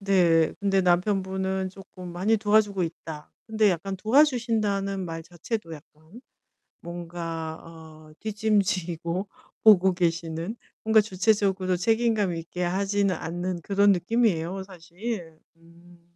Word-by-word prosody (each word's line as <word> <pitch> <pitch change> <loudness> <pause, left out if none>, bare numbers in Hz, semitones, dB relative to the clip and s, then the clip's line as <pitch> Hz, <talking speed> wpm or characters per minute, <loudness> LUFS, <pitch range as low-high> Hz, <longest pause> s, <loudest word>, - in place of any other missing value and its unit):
네 175 -5 +3
근데 195 -1 +2
남편분은 190 +1 0
쪼끔 185 -2 -11
"많이 195 +6 +2
도와주고 205 -2 +2
있다." 160 -2 -6 0.2
근데 220 -2 +3
약간 190 +3 -3
도와주신다는 220 -6 +2
말 165 -1 -6
자체도 175 +2 -5
약간 155 - -16 0.6
뭔가 165 -2 -6
어 160 -2 -13
뒷짐 215 -1 +1
지고 180 -1 -3 0.3
보고 190 -4 +6
계시는 170 +3 -2 0.3
뭔가 220 0 +5
주체적으로 195 -2 +1
책임감 220 -1 +1
있게 165 +2 -5
하지는 195 +2 +1
않는 175 +1 -4
그런 200 +1 +4
느낌이에요, 190 -2 0
사실. 175 -1 -7 0.2
음. 170 +1 -20
185 Hz, 265 characters per minute, -26 LUFS, 170-205 Hz, 0.6 s, 보고